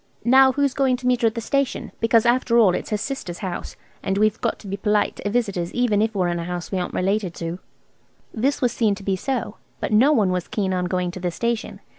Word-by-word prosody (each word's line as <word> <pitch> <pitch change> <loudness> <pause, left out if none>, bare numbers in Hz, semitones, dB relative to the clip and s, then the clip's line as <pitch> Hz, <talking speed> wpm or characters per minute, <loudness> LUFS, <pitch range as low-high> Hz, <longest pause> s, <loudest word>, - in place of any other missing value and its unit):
"Now 265 +2 +6
who's 280 -1 +1
going 265 -2 +2
to 250 - -10
meet 250 0 +2
her 230 - +4
at 220 - -1
the 230 - -3
station? 275 +3 -1
Because 225 0 +3
after 240 -1 +3
all 210 -6 +5
it's - - -3
her 210 - 0
sister's 210 -7 -5
house, 185 -4 -5 0.3
and 195 0 -1
we've 215 +1 +2
got 235 - 0
to 205 - -12
be 195 - -3
polite 210 +1 0
to 205 - -3
visitors 200 -7 -1
even 240 -4 +2
if 220 0 0
we're 185 -2 +1
in 175 0 -2
a 170 - -4
house 175 -1 -5
we 190 - 0
aren't 180 - -4
related 190 -1 0
to." 170 +2 -5 0.7
This 270 +5 0
was 245 - +3
seen 220 -4 +1
to 200 - -11
be 195 -1 0
so, 235 +1 -3 0.2
but - - -2
no 250 +8 +5
one 210 -10 +3
was 180 -1 -2
keen 195 -3 -1
on 180 -1 0
going 180 0 -1
to 185 - -8
the 180 0 -1
station. 235 +5 -3
215 Hz, 250 wpm, -22 LUFS, 185-245 Hz, 0.7 s, Now